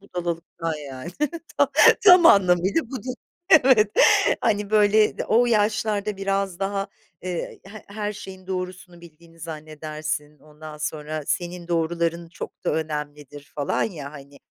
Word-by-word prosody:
budalalıktan 170 -3 -4
yani. 140 +2 -8 0.5
Ta - - +4 0.4
tam 360 -4 +8
anlamıyla 190 - +4
budur, 255 -1 -5 0.4
evet. 250 -8 +6 0.5
Hani, 210 -3 0
böyle, 215 0 +3
d - - -2
o 240 +3 +3
yaşlarda 210 -2 0
biraz 195 -2 -2
daha, 195 +1 -2 0.5
ııı, 180 - -2 0.3
he 205 +2 -12
her 210 0 -4
şeyin 190 -2 -11
doğrusunu 185 -1 -6
bildiğini 165 0 -17
zannedersin, 155 -1 -6
ondan 150 +1 -12
sonra 150 0 -4
senin 175 0 -3
doğruların 170 0 -1
çok 165 - -10
da - - +1
önemlidir 150 -2 -6
falan 145 -1 -1
ya 150 -9 -5
hani. 140 -1 -13
175 Hz, 130 wpm, -23 LUFS, 155-205 Hz, 0.5 s, tam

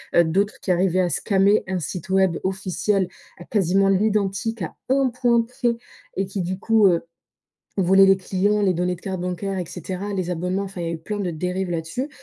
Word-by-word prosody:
heu, 170 - +7
d'autres 195 +6 0
qui 185 - -1
arrivaient 185 +1 +2
à 180 - +1
scammer 195 +5 +2
un 190 -1 -1
site 175 +3 -6
web 190 -3 +3
officiel 190 +2 -1 0.4
à, 175 - -10
quasiment, 195 -1 +2
l'identique, 205 +2 0
à 165 - -4 0.2
1 265 0 +3
point 240 -1 +2
près 240 0 -1 0.4
et 195 - 0
qui, 195 0 -4
du 185 +2 -3
coup, 220 -1 +4
heu, 170 -2 +3 0.8
volaient 195 +1 +6
les 195 - +5
clients, 200 +2 0
les 190 -2 +3
données 180 +1 -1
de 175 - -18
cartes 190 -3 -4
bancaires 185 +2 -3
et 180 - -3
cetera, 185 +4 -5
les 185 -2 -2
abonnements, 180 +3 -1
enfin, 190 -2 -7
il - - -3
y - - -2
a 170 - -2
eu - - -4
plein 205 +6 -5
de 180 -3 -1
dérives 180 +3 -2
là-dessus 170 - -3
190 Hz, 210 wpm, -23 LUFS, 180-205 Hz, 0.8 s, heu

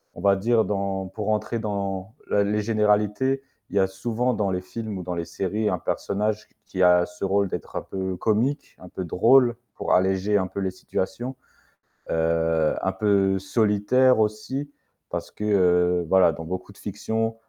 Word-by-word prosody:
on - - -9
va 100 0 +4
dire 115 +2 +3
dans 100 -2 -2
pour 105 +2 -4
entrer 110 +2 -1
dans 100 -2 -3 0.2
la 100 0 +3
les 105 +1 0
généralités, 105 +5 +1 0.3
il - - -8
y 100 - +4
a 95 - +4
souvent 120 +5 -1
dans 100 -3 0
les 90 0 -1
films 110 +1 -6
ou 90 - -5
dans 90 0 -4
les 85 - -3
séries 100 +5 -1
un - - 0
personnage 105 +1 -2 0.2
qui 95 - -4
a 90 -1 +6
ce 90 +2 -6
rôle 100 0 +1
d'être - - -6
un - - -1
peu 95 -1 -4
comique, 115 - 0
un 90 - -12
peu 95 - -5
drôle 120 +7 +4 0.2
pour - - -1
alléger 95 +2 +2
un 95 -1 0
peu 100 - -5
les 95 -1 -1
situations, 95 +7 -4 0.7
heu, 80 -1 +1
un - - 0
peu 100 -2 +2
solitaire 110 +5 +3
aussi. 130 +7 -1 0.4
Parce - - -5
que, 105 - -8
heu, 90 -3 +3
voilà, 95 -4 +5
dans 80 - -7
beaucoup 90 +2 -6
de - - -21
fictions, 115 0 -2
100 Hz, 180 wpm, -24 LUFS, 95-110 Hz, 0.7 s, a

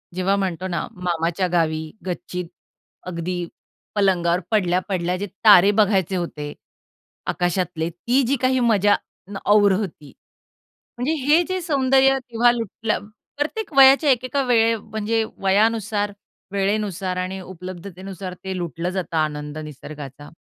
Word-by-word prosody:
जेव्हा 185 +2 +1
म्हणतो 185 -2 -2
ना 170 -4 -3
मामाच्या 175 0 -1
गावी, 160 -2 0
गच्चीत 180 0 -4 0.6
अगदी 175 0 -3 0.5
पलंगावर 180 -4 +2
पडल्या, 185 -4 +2
पडल्या 180 -1 -1
जे 205 +2 -4 0.2
तारे 205 -2 +8
बघायचे 195 -3 +2
होते, 150 -4 -4 0.7
आकाशातले, 175 -2 -1
ती 235 +10 +1
जी 275 - +2
काही 260 0 +2
मजा 210 -4 +4 0.4
ना 195 - -5
और 205 -1 +6
होती. 185 -7 -4 0.8
म्हणजे 255 +6 0
हे 305 +4 +5
जे 370 -1 -1
सौंदर्य 270 -3 +3
तेव्हा 240 +1 +4
लुटलं 225 -3 -3 0.3
प्रत्येक 315 +5 -3
वयाच्या 275 +2 +7
एक 255 0 +1
एका 275 +2 0
वेळे, 230 -2 +3
म्हणजे 220 +1 -2 0.2
वयानुसार, 205 +1 +2 0.4
वेळेनुसार 195 -2 -1
आणि 185 +1 -3
उपलब्धतेनुसार 185 +1 -8
ते 190 -1 -4
लुटलं 170 0 -3
जातं 180 -3 -3
आनंद 150 -1 -2
निसर्गाचा. 145 -1 -9
190 Hz, 125 wpm, -22 LUFS, 175-225 Hz, 0.8 s, तारे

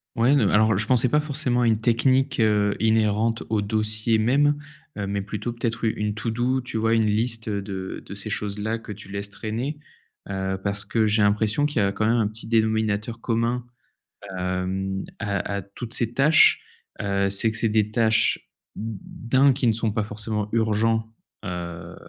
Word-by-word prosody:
Ouais 120 +5 +4
non 120 -8 +3
mais, - - 0
alors 110 0 +4
je 110 +2 -1
pensais 125 0 +4
pas 150 +5 +3
forcément 145 -5 -1
à 120 - +3
une 110 -2 +2
technique, 130 +4 +2
heu, 105 -2 +3
inhérente 110 +1 +2
au 110 -1 +1
dossier 110 +2 0
même, 140 +6 +3 0.4
heu, 100 - -2
mais 100 0 -2
plutôt 105 +4 -4
peut-être 115 -1 -3
u 110 - +3
une 105 0 -2
to 115 +1 -3
do, 125 +3 0
tu 125 -2 -5
vois? 110 +1 +2
Une 110 -1 +3
liste, 110 +2 -1
heu, 100 -2 -1
de 95 -1 -6
de 100 - -8
ces 100 +2 -5
choses-là 105 0 -2
que 115 - -9
tu 100 -1 -10
laisses 100 0 -4
traîner, 115 +8 -4 0.5
heu, 95 -1 -2
parce 100 0 -1
que 110 +2 +1
j'ai 105 0 +2
l'impression 105 +6 +2
qu'il 150 - -6
y - - +3
a 100 - +1
quand 110 +2 0
même 115 - +3
un 110 -3 +2
petit 110 +2 -7
dénominateur 110 0 0
commun, 115 +1 0 0.7
hem, 95 +1 -2
à 100 -1 -1 0.2
à 100 - -2
toutes 110 +5 -8
ces 120 -1 0
tâches, 150 +5 +5 0.4
heu, 100 -1 0
c'est 100 +3 +3
que 110 - -3
c'est 110 0 +1
des 105 -1 +2
tâches 110 0 +1 0.3
d' 110 +3 -6
1, 135 +1 +6
qui 130 -1 0
ne 115 - +4
sont 115 0 0
pas 105 - 0
forcément 105 0 -3
urgents, 110 0 +1 0.4
heu, 85 -2 -6
110 Hz, 195 wpm, -24 LUFS, 100-115 Hz, 0.7 s, 1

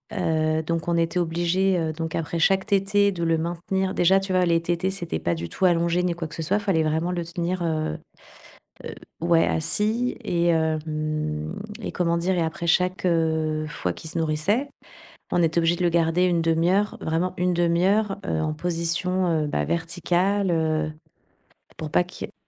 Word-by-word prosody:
Heu, 160 -3 +1
donc 165 +1 -3
on 170 - +1
était 165 +1 0
obligés, 175 +2 +1
heu, 160 -1 -1
donc 160 0 -4
après 165 +1 -2
chaque 190 +3 +2
tétée, 200 +1 +2
de 170 -2 -4
le 165 -1 +2
maintenir. 185 +3 -2
Déjà, 190 +2 +4
tu 195 -1 -4
vois, 180 -1 +3
les 165 -1 +2
tétées, 175 +2 -1
c'était 175 -3 -3
pas 85 - -1
du 85 0 -5
tout 190 - -1
allongé 170 0 +2
ni 180 - +1
quoi 165 -1 -5
que 155 - -10
ce 160 - -4
soit, 200 +6 +1
fallait 190 -7 +1
vraiment 160 +3 0
le 175 -1 -3
tenir, 175 +1 -3
heu 155 - -1 0.9
heu, - - -6 0.3
ouais 170 -1 +3
assis, 215 +9 +1
et 170 -1 0
hem 155 -1 -1 0.3
et - - -3
comment 170 -1 0
dire, 180 +2 0
et 170 - +2
après 160 +1 -3
chaque, 180 +2 +1
heu, 160 -2 +1
fois 90 -12 -3
qu'il 160 - -9
se 165 - -3
nourrissait, 165 - 0 0.6
on 175 - +2
était 165 0 +1
obligés 165 +1 +2
de 180 - -2
le 175 - +4
garder 170 +1 +2
1/2 165 -1 +2
heure, 205 +1 +1
vraiment 165 +3 -1
1/2 175 -1 +2
heure, 205 0 +2
heu, - - 0
en 155 -1 -1
position, 175 +3 -1 0.2
heu, - - -3
bah 75 - -1
verticale, 175 +3 0
heu, 155 -1 0 0.9
pour 155 -1 -5
pas 180 - +4
qu'il 180 - -8
y - - -18
ait - - -23
170 Hz, 190 wpm, -24 LUFS, 160-180 Hz, 0.9 s, Déjà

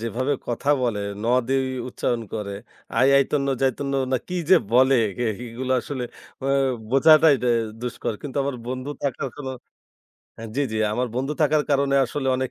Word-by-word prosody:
যেভাবে 120 +5 -1 0.2
কথা 125 +4 0
বলে 115 -4 0 0.2
'ন' 115 - -1 0.2
দেই 135 0 +1 0.2
উচ্চারণ 120 -1 -2
করে, 100 -2 -4 0.4
'আই 130 +3 +5
আইতন্ন 140 0 +1
যাইতন্ন 135 +1 0 0.2
না' 130 - +1
কি 180 - -3
যে 190 - +9 0.2
বলে 130 +2 +5 0.3
এইগুলা 125 +4 -3
আসলে 130 -4 -4 0.4
আ - - -1 0.4
বোঝাটাই 155 +2 +6
দা 125 - +2 0.3
দুষ্কর। 125 -1 -3
কিন্তু 140 -2 -7
আমার 140 -2 -2
বন্ধু 130 +2 -4
থাকার 135 0 -2
কোনো 135 -3 -5 0.8
হ্যাঁ 115 0 -8
জি, 145 - +2
জি 110 - -1
আমার 125 +3 -1
বন্ধু 135 +3 -1
থাকার 150 0 +3
কারণে 140 -1 +2
আসলে 135 +2 -4
অনেক 130 0 -2
130 Hz, 165 wpm, -23 LUFS, 125-140 Hz, 0.8 s, যে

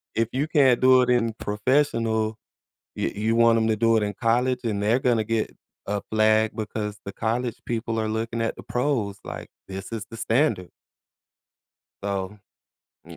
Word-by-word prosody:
If 115 0 +1
you 140 +4 0
can't 135 -6 +4
do 130 0 +6
it 125 - -1
in 120 -2 +2
professional, 110 -1 0 0.6
you - - 0
you 110 +3 0
want 115 0 +5
'em 110 0 +1
to 110 - +2
do 115 +1 +3
it 110 - +2
in 105 - -2
college? 125 +2 +2
And 105 -3 -1
they're 110 +5 +3
gonna 120 -4 +2
get 115 0 -2 0.3
a 100 0 -2
flag 110 0 +3
because 105 -1 -4
the 100 - -5
college 115 +3 -2
people 115 -1 -2
are 110 - -1
looking 115 +1 -2
at 115 - -2
the - - -10
pros 120 -7 -1
like, - - -7 0.2
"This 95 0 -7
is 110 -3 -4
the 115 - -8
standard." 110 - +1 1.3
So, 100 0 -3 0.7
m - - -11
115 Hz, 175 wpm, -25 LUFS, 105-120 Hz, 1.3 s, do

